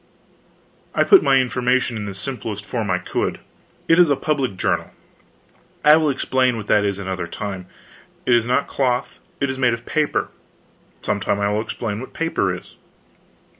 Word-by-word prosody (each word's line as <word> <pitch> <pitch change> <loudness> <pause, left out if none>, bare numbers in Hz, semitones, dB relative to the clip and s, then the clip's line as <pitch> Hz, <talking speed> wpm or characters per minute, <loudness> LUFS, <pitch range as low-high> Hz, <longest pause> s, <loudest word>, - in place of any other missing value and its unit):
I - - +4
put 390 - +7
my 135 - +4
information 125 0 +1
in 105 -2 -4
the 100 -1 -6
simplest 105 -2 -4
form 110 -1 -3
I 90 - +2
could: 90 - -2 0.5
"It 165 +1 +5
is 175 -3 +6
a 140 - +4
public 135 -9 -1
journal; - - 0 1.0
I 150 +1 +9
will 155 -2 +2
explain 130 -2 +1
what 105 - -6
that 105 -1 +3
is, 100 -1 0
another 95 -3 -4
time. 95 0 -6 0.6
It 125 - +3
is 120 -1 +3
not 125 - +1
cloth, 125 -2 -1 0.2
it 140 -1 0
is 130 - -6
made 125 -2 +3
of 115 0 -14
paper; 155 -1 0 0.7
some 100 - 0
time 100 +1 0
I 100 0 +1
will 105 +1 0
explain 110 -2 -4
what 130 - -9
paper 165 - 0
is. 90 0 -9
120 Hz, 175 wpm, -21 LUFS, 100-130 Hz, 1.0 s, I